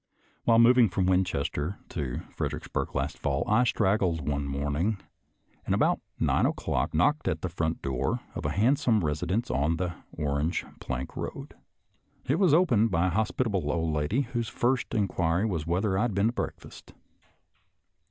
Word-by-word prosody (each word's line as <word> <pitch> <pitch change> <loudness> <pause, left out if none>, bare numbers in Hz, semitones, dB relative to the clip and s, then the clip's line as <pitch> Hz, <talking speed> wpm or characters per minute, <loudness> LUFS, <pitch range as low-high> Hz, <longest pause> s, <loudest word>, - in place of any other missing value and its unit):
While 115 -1 +5
moving 120 -1 +6
from 95 0 0
Winchester 90 -2 0
to 70 -7 -3
Fredericksburg - - -3
last 70 +2 -2
fall, - - 0
I 110 +4 +4
straggled 95 - +1
one 70 -1 -1
morning, 75 +9 -1 0.7
and - - 0
about - - +2 0.2
nine - - +3
o'clock - - -1
knocked 145 - +2
at - - -1
the 90 - -1
front 80 -1 -2
door 65 -2 -1
of - - -5
a 75 - 0
handsome 110 - +2
residence 90 - -1
on 70 +6 +1
the 90 -1 -2 0.2
Orange 75 +2 -1
Plank 65 +1 -5
road. - - -6 0.7
It 140 +6 +1
was 185 -6 +4
opened 130 - +4
by 90 0 +2
a - - -3
hospitable 105 - 0
old 80 -2 -1
lady 75 - +1
whose 120 -3 -3
first 125 +1 0
in 105 -3 +2
quiry 85 +2 0
was 85 -7 -2
whether 95 +3 +1
I 95 - +1
had 115 -4 0
been 100 +3 +3
to - - -4
breakfast. - - -7
90 Hz, 160 wpm, -28 LUFS, 75-115 Hz, 0.7 s, moving